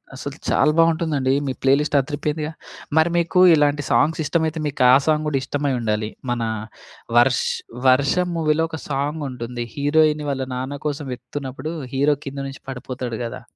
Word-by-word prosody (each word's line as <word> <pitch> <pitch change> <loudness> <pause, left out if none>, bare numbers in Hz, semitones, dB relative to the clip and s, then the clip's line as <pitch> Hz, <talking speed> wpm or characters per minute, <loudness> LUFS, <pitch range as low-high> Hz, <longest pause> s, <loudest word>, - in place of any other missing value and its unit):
అసలు 140 +3 -7
చాలా 150 +2 +4
బావుంటుందండి. 160 -5 +2
మీ 130 - -1
ప్లే 135 - +4
లిస్ట్ 150 -1 -1
అదిరిపోయిందిగా! 150 +2 -2 0.5
మరి 160 +2 +5
మీకు 170 +2 +1
ఇలాంటి 145 -1 +2
సాంగ్స్ 160 +3 +3
ఇష్టమైతే 160 0 0
మీకు 140 - -4
ఆ - - +8
సాంగ్ 155 -1 +2
గూడా 140 -2 +1
ఇష్టమై 145 0 -1
ఉండాలి. 105 -1 -1 0.2
మన 120 -1 -1 0.7
వర్ష్ 120 +1 +4 0.4
వర్షం 140 +8 +3
మూవీలో 160 0 +1
ఒక 160 - -5
సాంగ్ 145 +3 -2
ఉంటుంది. 120 -1 -5
హీరోయిని 150 +1 +2
వాళ్ళ 135 -1 -1
నాన్న 130 +3 -4
కోసం 145 -1 -2
వెతుకుతున్నప్పుడు 130 +3 -6 0.2
హీరో 140 +2 +3
కింద 140 0 -6
నుంచి 135 - -9
పడిపోతాడు 125 -2 -5
గదా! 115 - -6
145 Hz, 155 wpm, -22 LUFS, 130-155 Hz, 0.7 s, ఆ